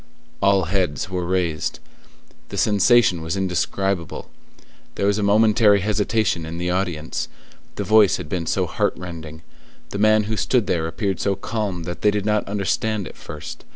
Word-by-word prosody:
All 100 Hz, -1 st, +4 dB
heads 90 Hz, -2 st, -1 dB
were 90 Hz, -2 st, -2 dB
raised: 85 Hz, -4 st, -1 dB, 0.7 s
the -, -, -6 dB
sensation 105 Hz, -3 st, +4 dB
was 80 Hz, +4 st, -3 dB
indescribable; 95 Hz, -1 st, -2 dB, 0.6 s
there -, -, -1 dB
was 100 Hz, +1 st, +2 dB
a -, -, 0 dB
momentary 105 Hz, 0 st, +4 dB
hesitation 105 Hz, -3 st, 0 dB
in 80 Hz, +1 st, -6 dB
the 90 Hz, +1 st, -1 dB
audience, 90 Hz, -4 st, -2 dB, 0.5 s
the -, -, -2 dB
voice 110 Hz, -3 st, +5 dB
had -, -, -7 dB
been 90 Hz, -4 st, -3 dB
so -, -, +1 dB
heart -, -, -1 dB
rending; 80 Hz, -3 st, -8 dB, 0.5 s
the 100 Hz, -, -4 dB
man 110 Hz, 0 st, +4 dB
who 110 Hz, +1 st, -3 dB
stood 125 Hz, -1 st, +1 dB
there 85 Hz, -4 st, 0 dB
appeared 95 Hz, +3 st, -2 dB
so 100 Hz, -1 st, +1 dB
calm 100 Hz, -3 st, -3 dB
that 85 Hz, +1 st, -6 dB
they 105 Hz, -, +4 dB
did 105 Hz, -1 st, -1 dB
not 105 Hz, -1 st, +1 dB
understand 100 Hz, +1 st, -1 dB
at -, -, -11 dB
first. 75 Hz, +2 st, -9 dB
95 Hz, 165 wpm, -22 LUFS, 85-105 Hz, 0.7 s, voice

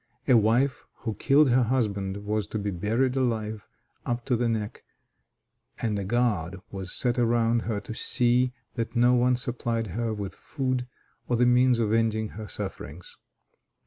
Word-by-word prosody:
A 130 Hz, -, +5 dB
wife 120 Hz, +5 st, +2 dB, 0.2 s
who 110 Hz, -, -2 dB
killed 140 Hz, +4 st, +4 dB
her 125 Hz, +2 st, +4 dB
husband 100 Hz, -5 st, -1 dB
was 105 Hz, -2 st, -1 dB
to 110 Hz, -, -4 dB
be 100 Hz, -1 st, -2 dB
buried 115 Hz, +8 st, 0 dB
alive 110 Hz, -5 st, -1 dB, 0.4 s
up 120 Hz, 0 st, -3 dB
to 125 Hz, -, +1 dB
the 120 Hz, 0 st, +1 dB
neck, 110 Hz, -2 st, -3 dB, 1.0 s
and 105 Hz, -3 st, -1 dB
a -, -, -2 dB
guard 100 Hz, -5 st, 0 dB
was 95 Hz, -2 st, -5 dB
set 125 Hz, 0 st, +1 dB
around 115 Hz, 0 st, +2 dB
her 105 Hz, -2 st, 0 dB
to -, -, -7 dB
see 125 Hz, +2 st, +2 dB, 0.2 s
that 115 Hz, +2 st, -4 dB
no 120 Hz, +1 st, +5 dB
one 125 Hz, +1 st, +3 dB
supplied 120 Hz, -2 st, -2 dB
her 115 Hz, +1 st, -1 dB
with 100 Hz, -2 st, -4 dB
food 130 Hz, -3 st, -3 dB, 0.4 s
or 120 Hz, -, +1 dB
the 120 Hz, +1 st, +3 dB
means 125 Hz, 0 st, +4 dB
of 110 Hz, -2 st, +1 dB
ending 110 Hz, -1 st, +1 dB
her 110 Hz, 0 st, -8 dB
sufferings. 90 Hz, -6 st, -7 dB
115 Hz, 165 wpm, -27 LUFS, 105-125 Hz, 1.0 s, A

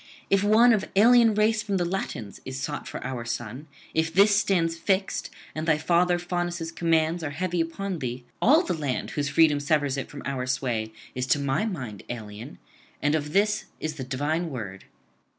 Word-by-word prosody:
If 195 Hz, 0 st, +4 dB
one 225 Hz, +3 st, +6 dB
of 205 Hz, -3 st, -1 dB
alien 230 Hz, +1 st, +6 dB
race 215 Hz, +1 st, +3 dB
from 205 Hz, -2 st, -1 dB
the 175 Hz, -, 0 dB
Latins 150 Hz, -, -4 dB
is 130 Hz, 0 st, -5 dB
sought 145 Hz, +2 st, -4 dB
for -, -, -6 dB
our 125 Hz, -3 st, -3 dB
son, 120 Hz, +4 st, -5 dB, 0.3 s
if 160 Hz, +1 st, +1 dB
this 200 Hz, +4 st, +5 dB
stands 170 Hz, -5 st, +2 dB
fixed, 190 Hz, +3 st, -1 dB, 0.2 s
and 155 Hz, +1 st, -4 dB
thy 155 Hz, -2 st, +4 dB
father 175 Hz, +2 st, +2 dB
Faunus' 175 Hz, -1 st, -3 dB
commands 165 Hz, 0 st, +1 dB
are 150 Hz, -, -2 dB
heavy 175 Hz, +3 st, -1 dB
upon 180 Hz, +2 st, -3 dB
thee, 125 Hz, -1 st, -4 dB, 0.2 s
all 305 Hz, +9 st, +6 dB
the -, -, -1 dB
land 145 Hz, -6 st, -3 dB
whose 145 Hz, -1 st, -1 dB
freedom 150 Hz, -1 st, +4 dB
severs 145 Hz, -1 st, +1 dB
it 135 Hz, -, -4 dB
from 145 Hz, -, -9 dB
our 130 Hz, -2 st, -2 dB
sway 120 Hz, -5 st, -1 dB, 0.2 s
is 125 Hz, 0 st, -3 dB
to 145 Hz, -, +3 dB
my 140 Hz, +7 st, 0 dB
mind 130 Hz, -, -5 dB
alien, 110 Hz, +3 st, -7 dB, 0.4 s
and 145 Hz, +1 st, +1 dB
of 150 Hz, -1 st, -1 dB
this 210 Hz, +1 st, +2 dB
is 155 Hz, -1 st, -4 dB
the 130 Hz, -, -4 dB
divine 145 Hz, +6 st, -1 dB
word. 100 Hz, -9 st, -7 dB
160 Hz, 185 wpm, -26 LUFS, 135-185 Hz, 0.4 s, one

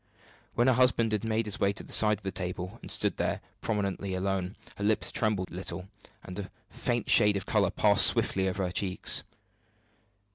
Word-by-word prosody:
When 120 Hz, -, +2 dB
her 130 Hz, -, +4 dB
husband 115 Hz, -4 st, +2 dB
made 110 Hz, 0 st, -1 dB
his 105 Hz, -, -3 dB
way 100 Hz, 0 st, +1 dB
to 100 Hz, -, -5 dB
the -, -, -7 dB
side 105 Hz, -1 st, +5 dB
of 110 Hz, -, -22 dB
the 95 Hz, -, -3 dB
table 95 Hz, +3 st, -5 dB
and -, -, -10 dB
stood -, -, +1 dB
there -, -, -1 dB, 0.2 s
prominently 100 Hz, -3 st, -3 dB
alone, 95 Hz, 0 st, -3 dB, 0.2 s
her 100 Hz, -, -5 dB
lips 110 Hz, +1 st, 0 dB
trembled 105 Hz, -4 st, -1 dB
a -, -, -9 dB
little, 95 Hz, 0 st, -5 dB, 0.3 s
and 95 Hz, +2 st, -8 dB
a 95 Hz, -, -7 dB, 0.2 s
faint 120 Hz, -2 st, -2 dB
shade 105 Hz, -3 st, +5 dB
of 95 Hz, -, -6 dB
color -, -, +1 dB
passed -, -, +5 dB
swiftly 95 Hz, 0 st, +1 dB
over 95 Hz, +1 st, -3 dB
her 90 Hz, -, -4 dB
cheeks. 90 Hz, 0 st, +1 dB
100 Hz, 190 wpm, -28 LUFS, 95-110 Hz, 0.3 s, side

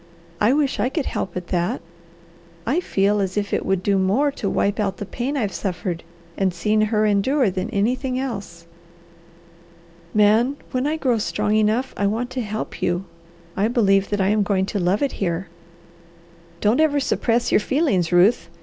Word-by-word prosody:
"I 210 Hz, +3 st, +4 dB
wish 285 Hz, -1 st, +1 dB
I 250 Hz, -, +1 dB
could 290 Hz, 0 st, -2 dB
help 190 Hz, -, -3 dB
at 180 Hz, -1 st, -6 dB
that. 175 Hz, -1 st, 0 dB, 0.9 s
I 275 Hz, +9 st, +1 dB
feel 205 Hz, -, +1 dB
as 190 Hz, 0 st, -2 dB
if 205 Hz, -1 st, -1 dB
it -, -, 0 dB
would 190 Hz, -1 st, 0 dB
do 200 Hz, -1 st, +2 dB
more 220 Hz, +11 st, +2 dB
to 210 Hz, -7 st, -3 dB
wipe 205 Hz, +3 st, 0 dB
out 195 Hz, -2 st, -1 dB
the 205 Hz, -, -5 dB
pain 260 Hz, +8 st, -3 dB
I've 210 Hz, -7 st, -1 dB
suffered 180 Hz, -3 st, -3 dB, 0.4 s
and 190 Hz, -1 st, +2 dB
seen 210 Hz, +5 st, +1 dB
her 215 Hz, -1 st, +2 dB
endure 210 Hz, +4 st, +2 dB
than 185 Hz, 0 st, -3 dB
anything 250 Hz, +4 st, 0 dB
else. 200 Hz, -10 st, -5 dB, 1.5 s
Man, 220 Hz, +7 st, +3 dB
when 255 Hz, +2 st, 0 dB
I 310 Hz, +1 st, 0 dB
grow 250 Hz, -6 st, +1 dB
strong 210 Hz, 0 st, -1 dB
enough 220 Hz, +5 st, +1 dB
I 200 Hz, -, +1 dB
want 235 Hz, +5 st, -2 dB
to 255 Hz, -, -2 dB
help 215 Hz, -1 st, -5 dB
you. 175 Hz, +2 st, 0 dB, 0.5 s
I 200 Hz, +3 st, +2 dB
believe 200 Hz, -5 st, +2 dB
that 205 Hz, -1 st, 0 dB
I 190 Hz, -, +2 dB
am 210 Hz, 0 st, +2 dB
going 195 Hz, -2 st, +1 dB
to 205 Hz, -, 0 dB
love 185 Hz, +7 st, +1 dB
it 280 Hz, -, 0 dB
here." 170 Hz, -1 st, -1 dB, 1.1 s
"Don't 215 Hz, +6 st, +3 dB
ever 295 Hz, -2 st, +3 dB
suppress 240 Hz, -3 st, 0 dB
your -, -, +5 dB
feelings, 210 Hz, -, +1 dB
Ruth!" 175 Hz, 0 st, +4 dB
210 Hz, 180 wpm, -22 LUFS, 195-250 Hz, 1.5 s, your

